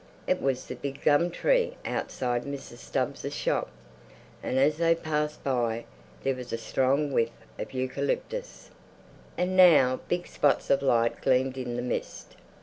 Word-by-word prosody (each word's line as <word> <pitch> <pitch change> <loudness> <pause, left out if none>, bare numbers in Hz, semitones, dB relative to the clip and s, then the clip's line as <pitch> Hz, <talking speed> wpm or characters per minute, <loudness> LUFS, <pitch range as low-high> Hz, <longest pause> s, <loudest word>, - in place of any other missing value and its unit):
It - - +1
was 135 -1 0
the - - -6
big 135 +2 -6
gum 150 +4 +4
tree - - +1
outside 125 -2 -1
Mrs. 140 -4 -7
Stubbs' - - -3
shop, - - 0 0.7
and 130 - -2
as 145 +3 +3
they 165 0 +3
passed 150 -2 -2
by 120 -4 0 0.4
there 135 - +2
was 125 -1 -8
a - - -1
strong 135 +5 +1
whiff 115 -3 +2 0.3
of - - -5
eucalyptus. 140 - -3 0.7
And 180 +1 0
now 150 -9 +6
big 175 0 -1
spots 145 - +1
of 140 0 +4
light 115 -4 +2
gleamed 130 0 +2
in 125 -2 -4
the 120 - -2
mist. 125 - -4
135 Hz, 150 wpm, -28 LUFS, 125-155 Hz, 0.7 s, now